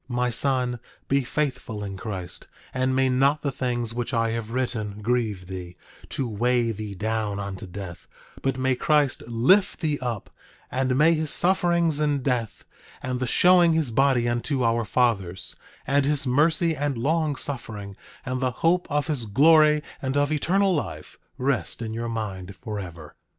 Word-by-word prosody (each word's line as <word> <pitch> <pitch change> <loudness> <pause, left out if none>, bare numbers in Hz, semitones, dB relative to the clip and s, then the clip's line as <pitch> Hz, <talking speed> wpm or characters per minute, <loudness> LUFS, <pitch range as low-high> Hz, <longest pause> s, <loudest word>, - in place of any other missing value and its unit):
9:25 120 - -4
My 125 0 +2
son, 125 -1 0 0.3
be 140 0 +2
faithful 125 -6 -3
in 100 -1 -5
Christ; 95 -3 -6 0.3
and 130 0 0
may 135 0 +3
not 135 +3 +2
the 140 - 0
things 120 -3 -2
which 120 +2 -3
I 115 0 +1
have 115 -1 -4
written 115 -4 -2
grieve 110 -6 0
thee, 90 -1 -8 0.3
to 135 - -2
weigh 120 +2 +1
thee 105 -1 -6
down 110 0 -2
unto 100 -1 -5
death; 90 -1 -8 0.3
but 135 -1 -1
may 130 0 +2
Christ 145 0 +2
lift 140 - +3
thee 150 -3 0
up, 120 -5 -4 0.4
and 130 0 0
may 160 +3 +5
his 155 -1 -1
sufferings 170 -3 +2
and 145 -3 +1
death, 120 -5 -2 0.4
and 125 -1 -2
the 130 - -1
showing 175 +4 +5
his 160 -6 0
body 130 -1 +3
unto 120 +3 -1
our 115 0 +1
fathers, 95 -6 0 0.3
and 140 +1 +2
his 145 0 +1
mercy 160 +5 +2
and 145 -3 -1
long 155 +4 +1
suffering, 105 -8 -5 0.3
and 130 0 -2
the 130 - +2
hope 165 +9 +1
of 145 -1 0
his 140 -8 -2
glory 150 +5 +5 0.2
and 135 +1 -1
of 145 +1 +2
eternal 190 +6 +2
life, 85 - -4 0.2
rest 135 -1 -1
in 110 -2 -4
your 115 +1 -3
mind 100 -4 -5
forever. 90 -7 -7
125 Hz, 165 wpm, -25 LUFS, 110-145 Hz, 0.4 s, may